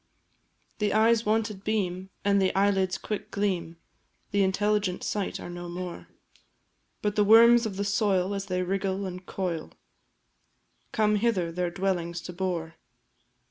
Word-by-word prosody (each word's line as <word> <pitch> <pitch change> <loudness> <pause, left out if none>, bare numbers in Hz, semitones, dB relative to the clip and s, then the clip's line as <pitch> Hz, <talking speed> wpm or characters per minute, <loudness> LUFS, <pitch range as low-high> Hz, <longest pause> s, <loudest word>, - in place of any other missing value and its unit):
The 210 -1 +1
eyes' 225 0 +4
wonted 215 -2 0
beam, 190 -3 -1 0.2
and 200 -1 +4
the 190 - +3
eyelids' 195 -2 +2
quick 210 - -5
gleam 180 -5 -2 0.5
The 200 - +2
intelligent 200 0 +1
sight, 205 -2 -2
are - - -7
no 175 0 -7
more; 175 0 -6 1.0
But 210 -1 0
the 210 - +4
worms 230 +2 +7
of 195 -3 -7
the 200 - -1
soil, 200 -2 +1
as 195 0 -4
they 185 -1 -1
wriggle 195 +1 -1
and 185 0 -6
coil, 180 -3 -4 1.2
Come 210 -1 +2
hither 200 -6 +1
their 180 +1 -1
dwellings 175 -2 -2
to 180 - -8
bore. 175 -3 -3
195 Hz, 140 wpm, -27 LUFS, 180-210 Hz, 1.2 s, worms